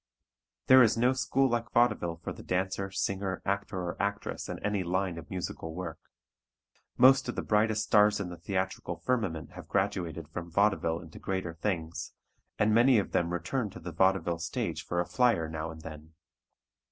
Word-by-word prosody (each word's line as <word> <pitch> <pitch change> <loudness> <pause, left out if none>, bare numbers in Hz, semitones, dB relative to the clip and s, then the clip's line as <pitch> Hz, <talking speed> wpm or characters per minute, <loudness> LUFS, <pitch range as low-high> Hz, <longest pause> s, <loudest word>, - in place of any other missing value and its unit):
There 130 0 +8
is 115 -2 +4
no 125 +3 +3
school 130 +1 +2
like 120 -1 -1
vaudeville 105 -8 +2
for - - -4
the - - -11
dancer, 95 +1 -1
singer, 95 -1 -2
actor 100 -1 -2
or 85 - -4
actress 100 0 -3
in - - -4
any 105 -2 0
line 90 -1 -1
of 75 - -12
musical 85 -3 -5
work. 90 -3 -5 1.0
Most 130 0 +6
of - - -3
the - - -2
brightest 110 0 +2
stars 105 0 +4
in 95 -3 -3
the 90 - -8
theatrical 95 -2 -2
firmament 100 -9 -2
have - - -10
graduated 90 -5 -1
from 85 +1 -6
vaudeville 90 -3 +1
into 80 0 -12
greater 95 -3 -3
things, 85 -1 -3 0.4
and 105 +1 +3
many 120 +2 +6
of 100 - 0
them 85 0 +1
return 95 +7 -2
to 95 - -10
the 90 0 -7
vaudeville 90 0 +2
stage 85 0 -3
for 85 - -2
a 90 - +1
flier 115 -10 +2
now 80 0 -4
and 80 0 -9
then. 80 0 -10
95 Hz, 175 wpm, -30 LUFS, 85-105 Hz, 1.0 s, There